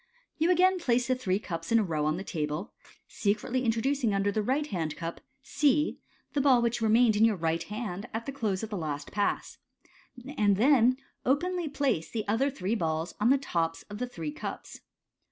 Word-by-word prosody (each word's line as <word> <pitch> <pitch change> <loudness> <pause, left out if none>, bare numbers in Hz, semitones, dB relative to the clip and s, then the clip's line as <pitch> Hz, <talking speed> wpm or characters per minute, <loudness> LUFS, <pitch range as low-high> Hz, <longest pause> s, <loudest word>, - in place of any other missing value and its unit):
— - - -43
You 325 +3 +3
again 365 +1 +4
place 245 -6 +1
the - - +4
three 200 -7 0
cups 185 +1 -6
in 230 - +6
a 220 - +3
row 155 -5 -1
on 155 +2 0
the 190 - -5
table, 155 +2 -3 0.3
secretly 220 +5 -1
introducing 235 0 +1
under 195 +1 +1
the 215 - 0
right 265 +7 0
hand 165 - -3
cup 165 0 -5 0.2
(C) 295 +1 +1 0.3
the 285 - +2
ball 265 -3 +5
which 235 0 0
remained 225 0 +4
in 210 - +3
your 225 -2 +4
right 165 -1 -1
hand 210 0 -5
at 225 +1 -4
the 275 - -3
close 220 -7 -2
of 220 - -5
the 205 - -2
last 145 -4 -4
Pass, 205 -1 -1 0.8
and 205 -5 +3
then 255 +1 +5 0.3
openly 345 +5 0
place 265 - 0
the 220 -2 -3 0.3
three 205 -6 -3
other - - +2
balls 165 -3 -2
on 215 +3 +3
the 275 - +5
tops 165 -11 -2
of 205 - -6
the 250 - -2
three 165 -10 -5
cups. - - -7
220 Hz, 200 wpm, -29 LUFS, 180-260 Hz, 0.8 s, in